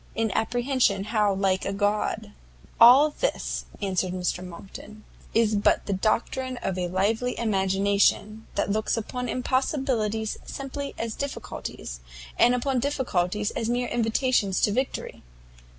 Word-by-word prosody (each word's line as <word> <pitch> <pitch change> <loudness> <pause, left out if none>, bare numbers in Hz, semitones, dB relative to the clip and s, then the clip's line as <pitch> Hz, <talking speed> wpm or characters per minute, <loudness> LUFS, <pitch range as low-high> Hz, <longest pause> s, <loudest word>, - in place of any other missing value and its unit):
in 225 -1 0
apprehension 240 -3 +1
how 210 -1 +1
like 190 -1 +1
a - - -2
God!_" 205 +1 +1
[Footnote: 215 -1 -13
Hamlet.] - - -23 0.5
"All 260 +6 +8
this," - - -2 0.2
answered 185 -2 0
Mr 180 0 -2
Monckton, 195 +4 -11 0.3
"is 225 -1 +3
but 205 -1 +2
the 200 - -1
doctrine 240 +6 -1
of 195 -5 -3
a 180 -1 -1
lively 215 +7 0
imagination, 200 +1 +1
that - - 0
looks 215 +2 0
upon 250 +2 -4
impossibilities 250 -5 -1
simply 275 +1 -6
as 230 -1 -3
difficulties, 240 - -6 0.4
and 245 - +5
upon 255 +1 0
difficulties 210 -7 -1
as 230 - -2
mere 245 0 0
invitations 225 -4 +1
to 210 - +3
victory. 260 +5 -3
220 Hz, 135 wpm, -26 LUFS, 200-250 Hz, 0.5 s, All